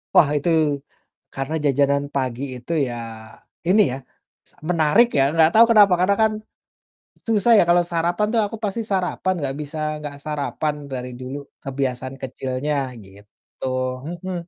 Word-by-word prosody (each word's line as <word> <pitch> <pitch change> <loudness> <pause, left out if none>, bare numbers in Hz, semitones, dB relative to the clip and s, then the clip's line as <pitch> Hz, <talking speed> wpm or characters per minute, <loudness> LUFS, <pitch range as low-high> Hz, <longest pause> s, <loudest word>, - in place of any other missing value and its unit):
Wah, 150 - +7
itu, 145 +4 -1 0.8
karena 135 +4 -3
jajanan 140 0 +2
pagi 130 -1 -1
itu 125 +6 -8 0.2
ya, 120 - -5 0.7
ini 200 +4 +5
ya, 130 - -3 0.5
sa - - -27
menarik 170 +7 +4
ya, - - +5
nggak 160 0 +5
tahu 225 +1 +8
kenapa, 205 -3 +7
karena 190 +3 +3
kan 220 - +3 1.0
susah 225 0 +3
ya, - - +6
kalau 175 0 +5
sarapan 175 +4 +1
tuh 230 - +4
aku 215 - -6
pasti 210 +3 -1
sarapan, 185 0 0
nggak 135 -2 -2
bisa 150 +1 -6 0.2
nggak 145 -1 -7
sarapan 150 0 -2 0.2
dari 125 -1 -4
dulu, 130 +2 -5 0.3
kebiasaan 130 -1 -3
kecilnya, 130 +3 -3 0.3
gitu, 100 +6 -12 0.4
mhm. 175 +3 -5
150 Hz, 145 wpm, -22 LUFS, 135-185 Hz, 1.0 s, tahu